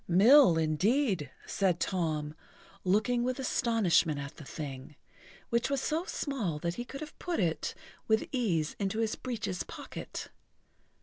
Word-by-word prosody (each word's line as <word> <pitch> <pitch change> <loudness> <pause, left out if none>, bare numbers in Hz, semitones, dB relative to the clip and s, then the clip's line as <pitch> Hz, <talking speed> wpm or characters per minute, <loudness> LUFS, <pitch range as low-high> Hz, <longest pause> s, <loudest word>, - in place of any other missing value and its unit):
"Mill, 200 - +7
indeed!" 180 - +1 0.2
said 185 -4 +1
Tom, 155 -5 -1 0.5
looking 220 +6 +2
with 255 0 -1
astonishment 225 - +2
at 140 0 -6
the 150 - -9
thing, 140 -1 -7 0.6
which 235 +2 +2
was 275 -1 +1
so 315 +6 -1
small 230 - -2
that 170 +3 -2
he 240 - -4
could 275 +3 -8
have 305 -1 -9
put 350 -1 -2
it 165 -3 0 0.3
with 220 0 +3
ease 180 - 0
into 200 +1 -1
his 225 -1 0
breeches 225 -8 -3
pocket. - - -7
200 Hz, 140 wpm, -31 LUFS, 160-245 Hz, 0.6 s, Mill